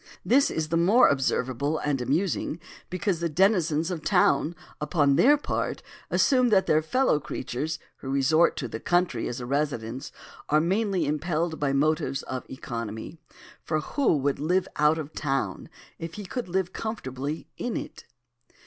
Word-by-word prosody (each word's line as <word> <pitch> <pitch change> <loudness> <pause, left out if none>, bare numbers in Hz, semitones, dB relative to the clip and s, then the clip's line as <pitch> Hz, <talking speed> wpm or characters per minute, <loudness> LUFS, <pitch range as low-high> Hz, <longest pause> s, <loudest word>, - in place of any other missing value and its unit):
This 275 +3 +4
is 155 -1 -2
the 165 - +1
more 200 +9 +5
observable 135 +2 0
and 145 -4 -1
amusing 160 +5 -1 0.3
because 185 -1 -1
the 170 0 -1
denizens 170 -2 +2
of 170 -3 -3
town 175 -3 +3 0.3
upon 145 -2 +2
their 290 - +6
part 290 - -3 0.3
assume 255 -3 +3
that 195 -3 +4
their 155 0 +3
fellow 255 - +2
creatures 150 +2 -4 0.2
who 135 - -8
resort 140 +5 +3
to 125 - -3
the 110 - -6
country 175 +5 +1
as 120 - -4
a 120 - -5
residence 130 -3 -2 0.4
are 150 - +4
mainly 190 +1 +1
impelled 160 +2 -1
by 145 -2 +1
motives 140 -1 +1
of 130 -1 -6
economy. 115 +2 -6 0.4
For 155 -1 0
who 240 - +1
would 140 0 0
live 180 +5 +1
out 150 +1 +4
of 155 -1 -6
town 135 - -2 0.3
if 165 0 -6
he 210 - -7
could 240 +1 -5
live 185 0 -1
comfortably 150 - -4
in 245 - -2
it? - - -8
155 Hz, 160 wpm, -26 LUFS, 140-180 Hz, 0.4 s, their